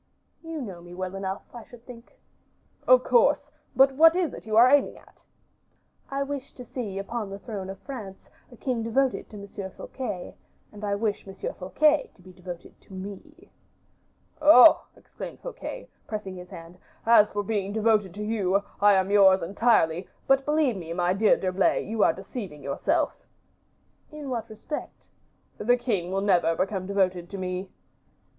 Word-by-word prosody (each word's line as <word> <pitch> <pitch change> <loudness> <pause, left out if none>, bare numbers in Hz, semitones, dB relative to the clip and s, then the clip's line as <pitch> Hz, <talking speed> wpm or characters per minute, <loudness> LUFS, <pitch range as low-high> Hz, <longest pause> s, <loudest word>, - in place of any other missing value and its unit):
"You 325 -1 -6
know 185 -6 -8
me 175 0 -12
well 185 0 -4
enough, 195 0 -4
I 240 -2 -9
should 240 -1 -16
think." 235 -1 -13 0.7
"Of - - +6
course; 480 - +3 0.2
but 270 +1 +6
what 325 +4 +6
is 355 -6 0
it - - -10
you 215 0 0
are 240 +2 +8
aiming 280 +2 +3
at?" - - -21 0.9
"I 275 0 -1
wish 275 -1 -6
to 250 - -10
see 220 -6 -5
upon 210 +1 -4
the 195 - -6
throne 200 -3 -7
of 195 - -7
France 215 -9 -9 0.2
a 245 - -14
king 245 0 -2
devoted 255 +3 0
to 210 - -10
Monsieur 200 -1 -7
Fouquet, 195 -3 -6 0.4
and 210 0 -12
I 200 -1 0
wish 205 -1 -2
Monsieur 195 0 -5
Fouquet 295 +11 +2
to - - -22
be 185 0 -14
devoted 180 -1 -10
to - - -17
me." 205 - -10 0.9
"Oh!" 300 0 +8
exclaimed - - -10
Fouquet, - - -7 0.2
pressing 210 -3 -5
his 180 0 -10
hand, 170 +2 -11 0.3
"as 220 -2 +6
for 205 0 -3
being 200 -1 -2
devoted 215 -3 +2
to 210 - -5
you, 200 -3 0 0.2
I 205 0 +6
am 190 0 +1
yours, 195 -2 +6
entirely; 185 -3 +2 0.2
but 270 0 +3
believe 295 -5 +2
me, 165 -2 -6
my 175 +1 +1
dear 210 +2 +4
D'Herblay, 185 0 +1
you 220 0 0
are - - +5
deceiving 190 - -8
yourself." 140 - 0 1.0
"In 300 -3 -7
what 235 -3 -3
respect?" 220 +8 -8 0.5
"The 245 +3 +3
king 200 -8 -2
will 195 +1 0
never 175 -4 +2
become 190 0 -2
devoted 185 -3 0
to 200 - -6
me." 185 0 -4
205 Hz, 170 wpm, -26 LUFS, 190-245 Hz, 1.0 s, are